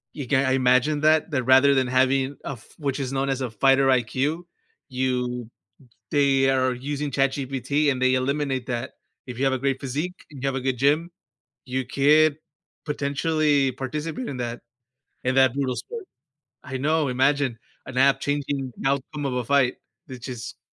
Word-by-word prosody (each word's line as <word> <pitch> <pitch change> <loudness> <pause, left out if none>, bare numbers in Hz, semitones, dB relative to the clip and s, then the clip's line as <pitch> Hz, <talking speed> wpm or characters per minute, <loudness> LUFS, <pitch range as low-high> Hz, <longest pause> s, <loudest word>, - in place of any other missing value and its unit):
You 140 -5 -5
can't 130 0 +2
imagine 130 +4 +3
that 155 +1 +3
that 130 -3 0
rather 130 +2 +5
than 130 -1 +2
having 130 +2 +2
a - - -4
f 115 - -14
which 140 -1 -2
is 135 0 -3
known 135 0 0
as 135 0 -1
a 125 - -2
fighter 135 +4 +3
IQ, 140 +8 0 0.4
you 125 -2 -2 0.6
they 135 -2 +3
are 130 -1 +2
using 145 +3 -4
ChatGPT 135 +2 0
and 130 -1 -2
they 130 0 +3
eliminate 135 -1 -1
that. 120 -1 -3 0.3
If 125 -1 -8
you 135 - +1
have 135 - +2
a - - -1
great 135 0 -1
physique 150 +7 -3 0.2
and 135 -3 -11
you - - 0
have 135 - -2
a 135 - -2
good 130 -1 -1
gym, 150 +6 +2 0.6
you 130 0 -2
could 150 +3 +4 0.5
potentially 145 -1 +1
participate 150 - -4
in 135 - -5
that 120 0 -4 0.6
in 130 +1 0
that 130 -2 +5
brutal 135 -3 -1
sport 460 -4 -7 0.6
I 130 -2 -5
know, 155 +1 +1
imagine 135 -1 +1 0.3
an 130 -1 -8
app 135 0 +4
changing 140 -2 -2
the 135 - -1
outcome 140 +1 -2
of 130 - -2
a 125 -1 -1
fight. 130 0 +3 0.3
It 130 -2 -8
just 125 -2 -7
135 Hz, 175 wpm, -24 LUFS, 130-145 Hz, 0.6 s, rather